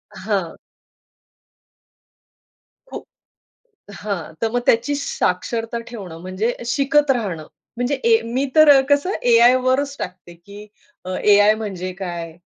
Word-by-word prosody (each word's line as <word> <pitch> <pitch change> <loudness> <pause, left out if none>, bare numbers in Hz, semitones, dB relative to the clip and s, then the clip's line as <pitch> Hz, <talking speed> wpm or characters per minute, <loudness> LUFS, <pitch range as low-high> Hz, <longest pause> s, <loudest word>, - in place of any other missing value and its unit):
हां. 190 -4 -3 2.3
खू - - -6 1.0
हां, 200 -6 -5
तर 225 - +1
मग 245 - 0
त्याची 240 +6 +2
साक्षरता 230 0 -2
ठेवणं 190 -8 -9
म्हणजे 185 +6 -2
शिकत 280 +3 +2
राहणं, 190 -11 -2 0.3
म्हणजे 245 +4 -1 0.2
ए 450 - +5
मी 250 +4 -2
तर 290 -3 +7
कसं 285 +6 +2 0.2
एआयवरच 255 +4 +3
टाकते, 180 -1 -8
की 200 +5 -13 0.4
अ, - - -8 0.2
एआय 205 +1 +5
म्हणजे 190 -4 -5
काय? 170 -3 -6
225 Hz, 110 wpm, -20 LUFS, 185-255 Hz, 2.3 s, तर